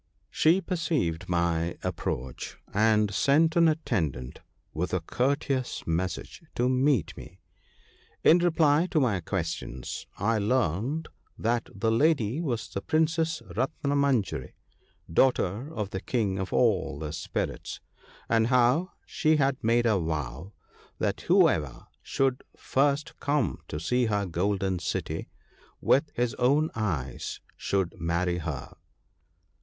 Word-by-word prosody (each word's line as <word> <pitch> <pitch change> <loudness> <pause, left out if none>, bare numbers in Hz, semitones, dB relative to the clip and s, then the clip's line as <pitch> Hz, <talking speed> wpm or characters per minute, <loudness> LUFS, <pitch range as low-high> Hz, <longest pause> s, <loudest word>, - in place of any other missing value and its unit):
She 170 +5 +4
perceived 145 - -1
my 85 -1 0
approach, 65 -8 -4 0.2
and 105 -1 +3
sent 160 +8 +3
an 170 -1 +6
atten 150 - +1
dant 65 -1 -9 0.3
with 90 +4 -1
a - - +1
courteous 130 - -1
message 90 - -3
to 120 - +2
meet 130 - +2
me. - - -12 0.8
In 170 - +7
reply 165 -1 +3
to 160 - +2
my 115 -9 +2
questions, 80 -8 -4
I 110 +2 +1
learned 120 - 0 0.3
that 115 +1 0
the 110 +3 0
lady 140 0 +2
was 125 -9 -2
the 100 - -5
Princess 160 -1 +1
Ratnamanjari, 140 -2 0 0.6
daughter 125 - +2
of 105 -9 -4
the 95 - -4
King 105 -6 -1
of 95 - -3
All 105 - +2
the 75 0 -5
Spirits 80 +1 -4 0.2
— - - -25
and 115 -1 +3
how 125 +8 +3
she 155 0 +2
had 140 -2 +1
made 120 +2 +3
a 110 -4 +3
vow 80 +2 -4 0.5
that - - -1
whoever 70 -5 +2 0.2
should 135 -2 0 0.2
first 140 +2 +1
come 140 - 0
to 75 - -4
see 125 +9 +1
her 105 -2 0
golden 95 +1 -1
city - - -3 0.5
with 140 +3 +3
his 120 -1 0
own 145 +5 +3
eyes 80 - -3 0.2
should 95 -3 -1
marry 85 +2 0
her. 75 -5 -5
115 Hz, 130 wpm, -28 LUFS, 90-140 Hz, 0.8 s, In